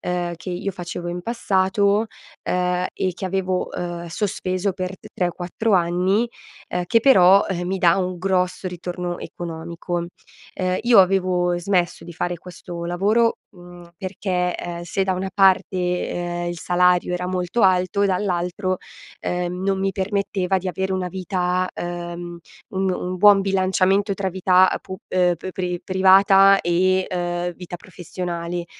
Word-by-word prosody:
ehm, 175 -1 -2
che 160 - -10
io 185 +3 -3
facevo 175 -1 -6
in 175 +1 -4
passato, 200 -1 +1 0.4
ehm, 180 0 0
e 185 - -1
che 190 - -7
avevo, 185 -1 -1
uhm, 175 -1 -4
sospeso 185 +1 -2
per 185 +1 -5
t - - -13
3 180 - 0
o - - -6
4 185 +6 -2
anni, 180 +5 +2 0.4
uhm, 180 0 -1
che, 230 +6 +3
però, 195 -6 +6
ehm, 175 -2 -3
mi 190 +2 -1
dà 170 0 +4
un 185 -1 -2
grosso 185 0 0
ritorno 180 0 -5
economico. 170 +1 -5 0.5
Ehm, 185 0 -1
io 235 -3 +7
avevo 180 -2 +2
smesso 175 -1 0
di 175 - -9
fare 175 +1 -2
questo 175 -1 -8
lavoro, 210 +7 +2 0.2
mhmm, 175 -1 -13
perché, 185 -2 -2
ehm, 170 0 -6
se 190 +3 -1
da 190 - +1
una 190 +1 -3
parte, 190 -1 +3 0.4
uhm, 175 0 -3
il 175 0 -5
salario 180 +1 +2
era 180 0 -3
molto 180 +4 -1
alto, 185 +1 +3
dall'altro, 185 0 -1 0.4
ehm, 180 +1 -3
non 195 0 0
mi 195 0 0
permetteva 190 -1 -1
di 185 +1 -4
avere 190 +2 -2
una 185 -1 -1
vita, 185 0 -1
uhm, 175 0 -5 0.3
un 190 0 0
un 180 +1 -4
buon 200 +1 +7
bilanciamento 195 +1 +2
tra 195 0 -2
vita, 185 0 +4
ehm, - - -2
pub 190 0 -8
uhm, 180 0 +1
pri 180 -1 -3
privata 195 +1 +6
e, 185 +2 +2
ehm, 175 -1 -2
vita 180 -1 -8
professionale, 175 -1 -5
180 Hz, 155 wpm, -22 LUFS, 175-190 Hz, 0.5 s, io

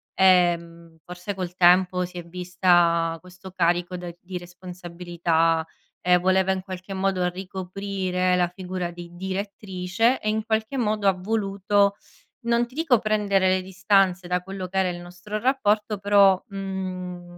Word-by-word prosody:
ehm, 170 -3 +2
forse 180 +3 -6
col 180 -2 -5
tempo 180 +1 +4
si 180 0 -10
è 175 - -5
vista 175 -2 +2
questo 180 +1 -13
carico 175 0 0
da 175 -1 -7
di 180 0 -6
responsabilità. 175 -2 -1 0.4
E 180 0 +6
voleva 190 +1 +2
in 190 - -3
qualche 185 0 -7
modo 190 -1 0
ricoprire 185 0 -2
la 180 -1 +2
figura 180 -1 -5
di 175 0 -11
direttrice 190 +4 -1
e 215 - -2
in 215 0 -1
qualche 220 +4 -1
modo 215 -4 0
ha 195 - +5
voluto, 200 0 +1 0.5
non 235 0 +2
ti 250 - -18
dico 295 -8 +3
prendere 205 -3 +1
le 185 0 +2
distanze 190 -1 +2
da 180 0 0
quello 190 0 -6
che 190 +2 -5
era 190 -1 +2
il 175 0 -5
nostro 180 +4 -6
rapporto 215 -4 +1
però, 200 -2 +5
mhmm, 185 -2 -6
185 Hz, 150 wpm, -24 LUFS, 180-200 Hz, 0.5 s, E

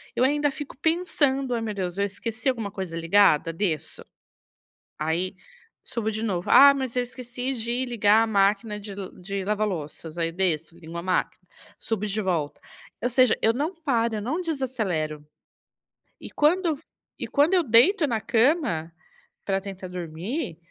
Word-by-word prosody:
eu 250 - +2
ainda 290 +2 +2
fico 285 0 -8
pensando: 285 -6 +1
"Ai, 230 - -1
meu 220 -2 -3
Deus, 185 -2 -3
eu 200 - +2
esqueci 220 +5 -3
alguma 225 -6 -2
coisa 190 -5 -5
ligada?", 165 -2 +4
desço, 165 -4 -2 0.9
aí 170 +5 -1 0.5
subo 220 -2 -3
de 220 +1 -3
novo. 180 -5 -2
"Ah, 280 0 +9
mas 260 -3 -4
eu 250 - +2
esqueci 250 +1 -5
de 240 +2 -2
ligar 220 -2 +4
a - - -1
máquina 210 +1 +1
de 200 -1 -8 0.3
de 195 +1 -4
lava-louças." 175 -6 -3
Aí 165 -1 0
eu - - -10
desço, 170 -3 -1
ligo 165 0 -9
a 170 - -4
máquina, 185 0 -1 0.3
subo 215 -2 -2
de 205 +2 -2
volta, 170 -6 -1 0.4
ou 245 - 0
seja, 255 -1 +4
eu 225 - +4
não 300 +9 -2
paro, 235 -8 0
eu 210 - -3
não 305 - -2
desacelero. 215 - -2 1.0
E - - -10
quando 335 +4 +2
e - - +2
f 295 +3 -11 0.4
e - - -3
quando 295 +5 +3
eu 365 - +5
deito 295 - +5
na 225 -3 0
cama, 230 - +1 0.5
para 195 -1 +1
tentar 190 -1 -7
dormir, 175 - -4
220 Hz, 170 wpm, -25 LUFS, 185-260 Hz, 1.0 s, Ah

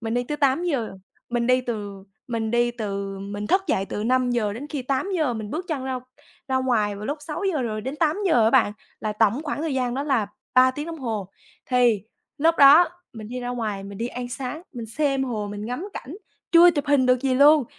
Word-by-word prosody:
mình 225 0 -3
đi 245 - +1
tới 295 +4 -3
8:00. 280 -3 +1 0.4
Mình 240 -1 0
đi 255 +1 +4
từ 205 -5 -5 0.2
mình 225 -2 -2
đi 240 +1 +2
từ 200 -4 -4
mình 205 +1 -5
thức 380 - +3
dậy 195 - +1
từ 210 - -4
5:00 245 -3 +1
đến 245 +7 -7
khi 290 -4 -3
8:00, 275 +1 0
mình 215 -2 -5
bước 330 +7 -3
chân 285 -5 -2
ra 260 -1 -2 0.5
ra 260 - +1
ngoài 230 -6 +1
vào 205 - -7
lúc 290 +2 -3
6:00 315 0 -2
rồi 215 -3 -3
đến 265 +6 -5
8:00 320 - +2
á 220 - +4
bạn, 240 -5 +4 0.3
là 215 -1 -2
tổng 220 +6 +2
khoảng 295 -1 -3
thời 320 -4 -1
gian 250 -2 -1
đó 275 - -1
là 265 -8 +1 0.3
3 255 0 +6
tiếng 295 +4 -6
đồng 330 -1 -6
hồ. 220 -8 -3 0.4
Thì 245 -5 +3 0.4
lúc 325 +3 +4
đó 290 +5 +8 0.2
mình 215 -2 -9
đi 250 +2 -5
ra 245 - -4
ngoài 220 -5 -3
mình 200 0 -9
đi 230 - -1
ăn 245 0 -5
sáng, 260 +5 -5
mình 235 -4 -6
xem 275 +3 0
hồ, 215 -5 -3
mình 205 +1 -6
ngắm 250 - -4
cảnh, 285 +8 -7 0.4
chưa 345 +1 +8
chụp 290 -4 -3
hình 285 -3 +3
được 255 -1 +3
gì 265 -2 +1
luôn, 290 +2 +6
250 Hz, 225 wpm, -24 LUFS, 220-285 Hz, 0.5 s, đó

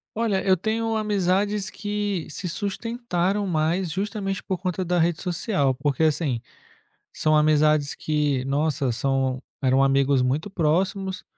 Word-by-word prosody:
Olha, 215 -4 0
eu 190 -1 +4
tenho 225 +3 -1
amizades 205 -1 0
que 205 -4 -3
se 180 +3 -4
sustentaram 205 -1 -2
mais 170 +2 0
justamente 195 +2 -3
por 190 -2 -3
conta 185 0 -2
da 175 0 0
rede 170 0 +1
social, 170 - 0
porque 145 +2 -1
assim, 150 -6 +1 0.7
são 155 0 +2
amizades 150 -1 +3
que 145 -4 0
nossa, 140 -1 0
são 130 +1 0 0.2
eram 130 +1 +3
amigos 135 -1 +3
muito 140 +10 -1
próximos, 185 +3 0
175 Hz, 130 wpm, -24 LUFS, 145-195 Hz, 0.7 s, eu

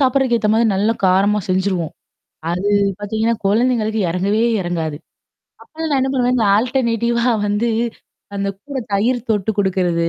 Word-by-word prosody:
சாப்புடுறதுக்கு 260 -2 +2
ஏத்த 215 -1 0
மாரி 225 +2 +3
நல்ல 205 +4 +1 0.2
காரமா 195 +3 +3
செஞ்சுருவோம். 185 -3 0 0.6
அது 180 +4 -1 0.3
பார்த்தீங்கன்னா, 220 +3 -1
குழந்தைங்களுக்கு 220 +1 +1
இறங்கவே 195 +6 0 0.2
இறங்காது. 165 -4 -3 0.7
அப்பலாம் 320 0 -6
நான் 275 -2 +2
என்ன 265 +1 0
பண்ணுவேன். 250 -1 +1
இந்த 225 -4 +2
ஆல்டர்னேட்டிவா 235 0 0 0.2
வந்து, 205 +3 0 0.7
அந்த 200 0 -2
கூட 285 -2 -5
தயிறு 230 +6 +2
தொட்டு 210 -1 +1
குடுக்கிறது. 180 -4 +1
215 Hz, 135 wpm, -19 LUFS, 190-240 Hz, 0.7 s, மாரி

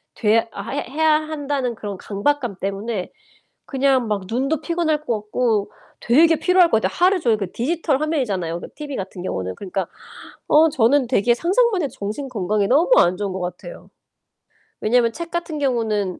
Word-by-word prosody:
돼야 225 0 +3 0.3
해 285 - -2
해야 310 +2 +2
한다는 285 -5 -3
그런 205 -3 -6
강박감 240 +2 -1
때문에 200 0 -3 0.5
그냥 265 -3 +1
막 210 -2 -1
눈도 275 +6 -1
피곤할 325 -3 0
것 240 - -1
같고 215 -1 0 0.3
되게 320 +7 +4
피로할 360 +2 +4
것 220 - +3
같아. - - -1
하루 370 +2 +3
종일 230 -8 +1
그 195 -3 -4
디지털 295 +2 -1
화면이잖아요 200 - -1
그 - - -7
TV 290 -3 -6
같은 185 -1 -6
경우는. 95 - -3
그러니까 190 -2 -4 0.6
어 315 +2 +5
저는 265 0 +2
되게 240 -1 +3
상상만 390 - +2
해도 275 - -2
정신 215 +8 -4
건강에 205 -2 0
너무 310 - +3
안 180 +1 +3
좋은 200 -2 -3
것 190 - -4
같아요. 180 - -7 0.9
왜냐면 235 +1 +3
책 335 +1 -6
같은 335 -3 -3
경우는 220 -8 -1
250 Hz, 350 characters per minute, -21 LUFS, 205-305 Hz, 0.9 s, 어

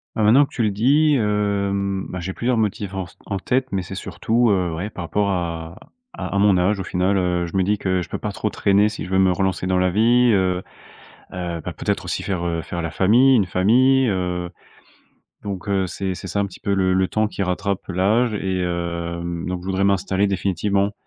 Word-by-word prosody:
Bah, 110 - 0
maintenant 120 +7 +6
que - - -20
tu 120 - 0
le 105 - +1
dis, 145 +8 +3
hem, 100 -3 0
bah, 90 - -5
j'ai 95 +2 -4
plusieurs 120 +5 -1
motifs 105 -2 -1
en 95 -1 -3
s 85 - -18
en 100 - -3
tête, 125 +7 0
mais 95 - 0
c'est 95 +2 -8
surtout, 115 +4 0
heu, 90 -4 +1
ouais 90 +6 -4
par 90 -4 -7
rapport 100 +4 0
à 85 -3 -3 0.4
à - - -5
à - - +2
mon 100 -2 +4
âge, 95 +3 +1
au 95 - -4
final, 95 +2 +1
heu. 90 -2 0
Je 85 +3 -4
me 95 - +3
dis 105 +3 +1
que 95 -2 0
je - - -6
peux - - -4
pas - - -4
trop - - -2
traîner, 100 +1 +3
si 105 - -5
je 90 - -7
veux 95 - +2
me 95 -1 +4
relancer 95 -1 -1
dans 95 0 +1
la 90 0 +2
vie, 120 +5 +4
heu. 95 -2 +1 0.7
Heu, 85 -2 -4
bah, - - -4
peut-être - - -2
aussi - - -3
faire, 90 -3 -3
heu, 85 -1 -1
faire 85 +1 -5
la 85 - -3
famille, 120 +10 +4
une 100 -5 +2
famille, 125 +9 +3
heu. 90 -3 -2 0.9
Donc, 100 -1 -6
heu, 95 -1 +1
c'est 95 +1 -3
c'est 90 - -8
ça, 100 - -1
un 100 - +1
petit 95 - -13
peu 100 - -1
le 95 -1 +2
le 95 0 +2
temps 110 0 0
qui 100 - -4
rattrape 95 +1 -2
l'âge 105 +6 +2
et 95 -3 -2
hem, 85 0 -3
donc 90 -1 -3
je 90 - -10
voudrais 95 0 0
m'installer 100 0 +1
définitivement. 100 +1 0
95 Hz, 230 wpm, -21 LUFS, 90-105 Hz, 0.9 s, maintenant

